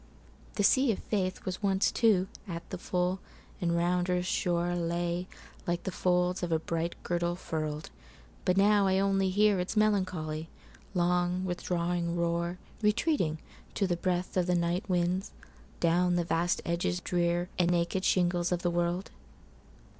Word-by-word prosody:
The 205 - +1
sea 260 +5 +5
of 200 - -6
faithWas 185 -2 -1
once, 195 -1 +2
too, 205 -6 +3 0.2
at 170 -2 -6
the 185 - -4
full, 180 +1 -1 0.4
and 170 -1 +1
round 180 +1 +1
earth's 180 0 0
shoreLay 175 0 0 0.4
like 175 0 -1
the 190 - -3
folds 180 0 +1
of 175 -2 -2
a 160 - +4
bright 165 +1 -2
girdle 175 0 0
furl'd. 155 -3 -4 0.5
But 180 +1 +2
now 200 0 +5
I 190 0 +3
only 195 -1 +2
hearIts 200 0 +2
melancholy, 180 -7 0 0.5
long, 180 +1 +1
withdrawing 175 -1 -1
roar, 170 +1 -1 0.2
Retreating, 210 - +1 0.4
to 200 - +1
the 180 -2 +1
breathOf 180 +1 0
the 180 - +2
night 175 +3 0
winds, 180 +1 0 0.5
down 175 +1 +3
the 175 - +2
vast 170 +1 0
edges 175 +1 0
drearAnd 175 0 0
naked 175 +2 +1
shingles 175 -2 +2
of 180 -1 -1
the 175 - +1
world. 175 +2 -1
180 Hz, 140 wpm, -30 LUFS, 170-185 Hz, 0.5 s, sea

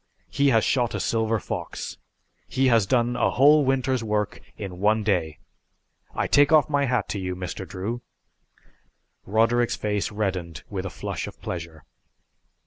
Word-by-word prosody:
He 140 +1 +2
has 115 -5 +4
shot 120 -3 +1
a - - -2
silver 110 -1 0
fox. - - -6 0.5
He 130 0 +2
has 115 -4 +3
done 120 +2 +2
a - - +2
whole 145 +3 +5
winter's 130 -2 +1
work 105 -1 -1 0.2
in 95 -3 -7
one 105 +2 +2
day. 85 -7 0 0.8
I - - 0
take 145 +1 +4
off 155 -2 +6
my 145 -2 +1
hat 125 -5 0
to 100 - -2
you, 90 -1 -3
Mr. 90 +1 -6
Drew!" 110 +6 -4 1.3
Roderick's 115 +3 +2
face 105 -1 -2
reddened 95 -5 -3
with 95 -1 -3
a - - -5
flush 75 - -5
of - - -11
pleasure. 80 -3 -6
110 Hz, 155 wpm, -25 LUFS, 95-125 Hz, 1.3 s, off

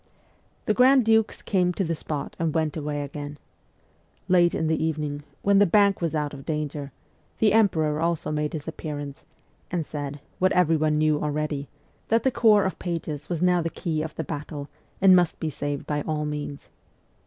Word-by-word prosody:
The 215 - +2
grand 255 +1 +5
dukes 225 -1 +2
came 180 -3 +1
to 195 - -1
the 165 -2 -1
spot 150 -2 -5
and 165 -2 +1
w 160 - -1
r - - +3
ent 155 -2 -4
away 145 -2 -3
again. 145 +1 -7 0.9
Late 175 -1 +4
in 160 - 0
the 160 0 +1
evening, 150 -2 -2 0.2
when 200 0 +4
the 205 - +5
Bank 200 +1 +4
was 165 -2 -1
out 150 -1 -1
of 135 -1 -9
danger, 150 -2 -3 0.5
the 210 -2 +3
emperor 160 -9 +3
also 170 -2 -1
made 150 0 -1
his 155 -1 -5
appearance, 145 -3 -6 0.4
and 175 -3 -2
said, 145 -1 -5 0.2
what 185 0 +3
everyone 155 -3 +3
knew 155 -1 +2
already, 150 -1 -2 0.4
that 230 0 +2
the 265 - +3
Corps 215 -5 +4
of 190 - -3
Pages 160 -4 -4
was 175 -1 -1
now 180 -1 +4
the 165 - -1
key 160 -2 -2
of 155 0 -5
the 160 - -3
battle, 145 -1 -6 0.3
and 190 -1 +7
must 175 -2 +2
be 155 - -2
saved 145 0 -4
by 150 -1 -1
all 150 0 -2
means. 150 -1 -5
155 Hz, 190 wpm, -25 LUFS, 150-180 Hz, 0.9 s, and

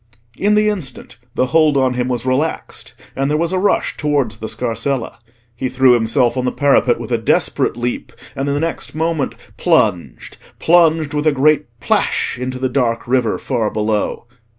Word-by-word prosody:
In 210 +1 +2
the 210 0 +3
instant 160 - -4 0.2
the 130 - +2
hold 155 0 +3
on 130 -1 +2
him 125 0 -1
was 125 -1 -2
relaxed, 135 +5 -2 0.2
and 135 +1 -1
there 150 - +1
was 170 +3 0
a 185 - +1
rush 200 - 0
towards 145 -7 0
the 110 - -6
scarsella. 115 +3 -3 0.4
He 130 +2 -3
threw 130 -1 +4
himself 120 +1 +2
on 130 - -1
the 125 - +1
parapet 140 -4 +2
with - - -7
a 120 - +1
desperate 110 +1 0
leap, 120 0 -3 0.2
and 135 +1 -2
the 140 0 0
next 165 0 -3
moment 160 -3 -1 0.2
plunged—plunged 160 - +1
with 150 +1 0
a - - +5
great 150 +1 +2
plash 125 - 0
into 130 0 -4
the 130 0 -1
dark 120 -3 -1
river 125 -3 +1
far 115 -5 -1
below. 105 +1 -2
130 Hz, 175 wpm, -18 LUFS, 120-155 Hz, 0.4 s, a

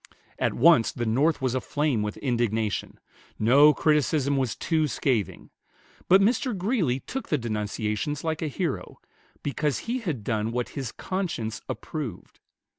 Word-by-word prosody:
At - - 0
once 150 -3 +5
the 120 - -3
North 135 +6 +2
was 130 -2 +1
aflame 130 -1 0
with 105 0 -3
indignation. 115 - -1 0.4
No 140 +7 +6
criticism 150 -2 +2
was 130 -5 0
too 160 -2 +1
scathing; 125 -7 -1 0.6
but 190 +2 +6
Mr. 235 +2 +1
Greeley 180 - 0
took 265 - -6
the 150 - +2
denunciations 110 +3 -2
like 160 -1 -2
a 160 - -1
hero, 140 - -3 0.5
because 145 0 -1
he 245 +3 0
had 160 - -3
done 110 -1 -1
what 125 0 -2
his 130 -5 -5
conscience 165 - -3
approved. 150 -8 -6
140 Hz, 140 wpm, -26 LUFS, 115-160 Hz, 0.6 s, No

